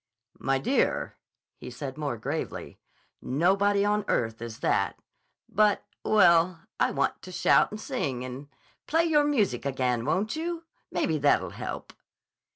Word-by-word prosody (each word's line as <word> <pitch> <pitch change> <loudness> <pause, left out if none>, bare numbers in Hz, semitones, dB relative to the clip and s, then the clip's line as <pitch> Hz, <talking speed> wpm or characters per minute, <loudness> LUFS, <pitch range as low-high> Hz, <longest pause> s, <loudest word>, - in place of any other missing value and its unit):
"My 135 0 +1
dear," 255 - 0 0.4
he - - -8
said 135 -3 -6
more 145 -6 -3
gravely. 140 +8 -5 0.4
"Nobody 195 +8 +2
on 210 0 +1
earth 115 -1 0
is 115 -2 -6
that. - - +1 0.5
But—well, 185 -4 +3 0.2
I - - +3
want - - -1
to 185 - -10
shout - - +4
and 215 - -7
sing 140 - -3
and—Play 145 - -4
your 305 -3 +4
music 215 - +1
again, 130 -3 0
won't 190 - 0
you? 335 +1 -3 0.3
Maybe 160 -3 0
that'll 145 0 +2
help." - - -6
170 Hz, 130 wpm, -27 LUFS, 135-210 Hz, 0.5 s, shout